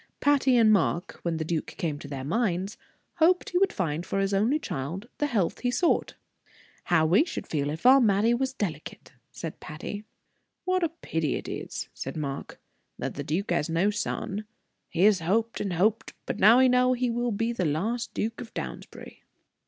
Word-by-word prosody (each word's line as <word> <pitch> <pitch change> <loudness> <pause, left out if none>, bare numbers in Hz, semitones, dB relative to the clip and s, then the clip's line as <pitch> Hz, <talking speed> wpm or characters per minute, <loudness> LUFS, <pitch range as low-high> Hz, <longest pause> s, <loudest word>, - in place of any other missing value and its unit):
Patty 275 -3 +3
and 220 -2 +6
Mark, 180 -1 0
when 170 -2 -1
the 160 - -2
duke 160 -1 -2
came 160 -7 -2
to 145 - -9
their 135 -2 -5
minds, 190 - -1 0.4
hoped 350 +2 +3
he 360 - +2
would 390 - +3
find 165 -3 -2
for 195 - -3
his 195 0 0
only 220 +9 +3
child 175 - -5
the 295 - +2
health 210 -10 0
he 245 - 0
sought. 335 +7 +1 0.7
"How 160 -3 +3
we 180 - +5
should 345 - -5
feel 145 -2 -1
if 160 +7 -6
our 265 +2 +8
Mattie 215 +1 +3
was 260 +2 0
delicate!" 180 - -5 0.2
said 165 - -7
Patty. 180 +7 -7 0.6
"What 370 0 +1
a 335 - +2
pity 165 - -2
it - - -5
is," - - -5
said 135 +3 -6
Mark, 140 -2 -5 0.4
"that - - -4
the 145 - -5
duke 175 +7 -2
has 170 -2 +1
no 170 +5 +2
son. 210 0 -3 0.4
He 175 +1 0
has 205 -2 +5
hoped 220 +7 0
and 195 -3 -2
hoped, 210 +6 +1
but - - -4
now 215 +5 +7
he 260 0 +6
knows 250 0 +3
he 250 -1 0
will 240 +1 -1
be 230 +3 -1
the 190 -6 -1
last 205 +11 -1
Duke 225 +2 -2
of 235 - -9
Downsbury." - - -7
205 Hz, 190 wpm, -27 LUFS, 165-245 Hz, 0.7 s, our